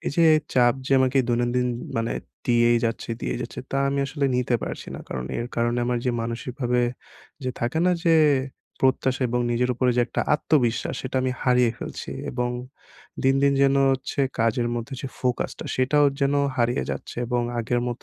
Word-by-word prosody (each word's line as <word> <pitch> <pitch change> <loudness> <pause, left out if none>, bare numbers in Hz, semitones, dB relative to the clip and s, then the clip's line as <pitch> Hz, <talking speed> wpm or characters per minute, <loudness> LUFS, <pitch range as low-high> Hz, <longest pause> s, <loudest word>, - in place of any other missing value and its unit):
এই - - +1
যে 170 - +5 0.3
চাপ 120 -1 +5
যে 135 - 0
আমাকে 130 +1 +2
দৈনন্দিন 120 +1 +1 0.3
মানে 115 0 0 0.3
দিয়েই 120 -1 +4
যাচ্ছে, 115 +1 -2
দিয়েই - - -2
যাচ্ছে 120 - -6
তা 135 - 0
আমি 140 0 -1
আসলে 140 +1 -2
নিতে 125 0 +1
পারছি - - -5
না। - - -7
কারণ 65 -1 -4
এর 120 - -2
কারণে 120 +1 +1
আমার 125 0 0
যে 125 - +2
মানসিকভাবে 125 +1 -2 0.6
যে 130 - 0
থাকে 120 +7 -1
না - - +4
যে 165 -1 +5 0.6
প্রত্যাশা 130 0 +2
এবং 125 +1 0
নিজের 125 +1 +1
উপরে 125 +1 +2
যে - - +4
একটা 120 - -2
আত্মবিশ্বাস 130 -7 +1
সেটা 130 0 -4
আমি 130 0 0
হারিয়ে 125 -2 +4
ফেলছি। - - -6 0.2
এবং 125 0 -1 0.7
দিন, 135 0 +4
দিন 140 0 +4
যেন 135 0 +4 0.2
হচ্ছে 135 +1 -3 0.2
কাজের 115 +1 +1
মধ্যে 120 +3 -4
যে - - -3
ফোকাসটা 125 -1 -2
সেটাও 145 +3 +4
যেন 140 0 +2 0.2
হারিয়ে 120 - +1
যাচ্ছে - - -6
এবং 120 0 0 0.2
আগের 120 +1 0
মত 120 - -5
125 Hz, 180 wpm, -24 LUFS, 120-135 Hz, 0.7 s, যে